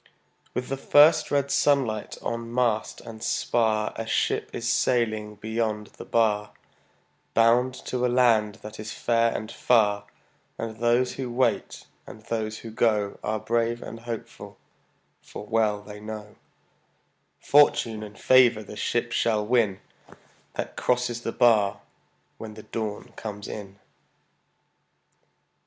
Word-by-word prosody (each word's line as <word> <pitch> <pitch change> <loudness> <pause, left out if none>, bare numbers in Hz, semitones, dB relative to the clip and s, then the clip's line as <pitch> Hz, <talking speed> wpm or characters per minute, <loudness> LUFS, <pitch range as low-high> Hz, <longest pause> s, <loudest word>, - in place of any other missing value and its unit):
With 125 0 -3
the 135 - -2
first 145 +3 +5
red 140 -1 +1
sunlight 130 -7 +1
on 115 0 -4
mast 120 -3 0
and 115 -2 -10
spar 110 -2 0
A 115 - -5
ship - - 0
is - - -4
sailing 110 -4 +1
beyond 110 0 -2
the - - -7
bar, 105 -2 +1 0.8
Bound 120 +3 +4
to 125 -1 -2
a 125 - +3
land 115 -4 +3
that 105 0 -9
is 110 0 -6
fair 115 +1 +1
and 110 +1 -5
far; 105 -4 +2 0.5
And 110 -1 -5
those 120 +2 +2
who 130 -3 -5
wait 125 +2 0 0.2
and 110 - -11
those 110 -1 -3
who 115 - -6
go 105 -3 +1
Are 110 0 -1
brave 115 +1 -1
and 115 - -8
hopeful, 115 -1 -8 0.6
for - - -9
well 105 -2 +1
they 105 0 -10
know 105 0 -8 1.0
Fortune 120 -6 +3
and 105 -1 -9
favor 125 -4 +5
the 105 - -10
ship 120 +3 -1
shall 110 -3 +1
win 110 -5 +1 0.7
That - - -4
crosses 125 -1 0
the 115 - -3
bar 110 -6 +3 0.6
when 110 -1 -8
the 110 - -10
dawn 110 +1 -5
comes 105 -2 -6
in. 100 -2 -8
115 Hz, 135 wpm, -26 LUFS, 105-120 Hz, 1.0 s, first